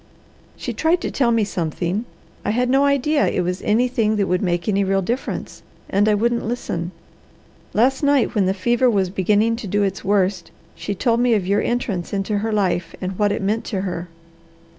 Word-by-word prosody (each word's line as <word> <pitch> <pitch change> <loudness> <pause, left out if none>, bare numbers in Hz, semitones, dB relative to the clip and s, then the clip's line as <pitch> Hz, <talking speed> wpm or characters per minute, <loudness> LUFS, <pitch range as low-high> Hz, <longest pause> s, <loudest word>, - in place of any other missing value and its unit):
She - - -4
tried 330 +3 +2
to - - -3
tell 255 -4 +2
me 230 -2 +3
something; 180 +2 -2 0.4
I - - -2
had 250 +3 +1
no 275 +1 +4
idea 280 +2 +2
it - - 0
was 180 +1 -2
anything 225 0 +1
that 205 -2 +1
would 180 0 +1
make 175 -3 -1
any 200 -1 +2
real 195 0 +1
difference, 240 +8 -4 0.3
and 205 +2 +3
I 210 - +4
wouldn't 235 +3 0
listen. 180 -7 -3 0.9
Last 260 +5 +3
night, 285 -3 +2
when 200 -4 +2
the 190 - +1
fever 240 +6 +2
was 195 -5 +1
beginning 210 +4 +2
to 230 - -6
do 205 +2 +1
its 195 -1 -2
worst, 195 -2 +1 0.2
she 175 +5 -4
told 230 +4 +1
me 240 -1 +3
of 200 -4 0
your 200 +2 +2
entrance 205 -8 -2
into 200 +1 -1
her 220 +2 -2
life 185 -5 0
and 185 +1 -5
what 205 -1 +3
it - - -2
meant 215 +3 0
to 195 -5 -2
her. 180 -2 -4
205 Hz, 200 wpm, -21 LUFS, 190-235 Hz, 0.9 s, no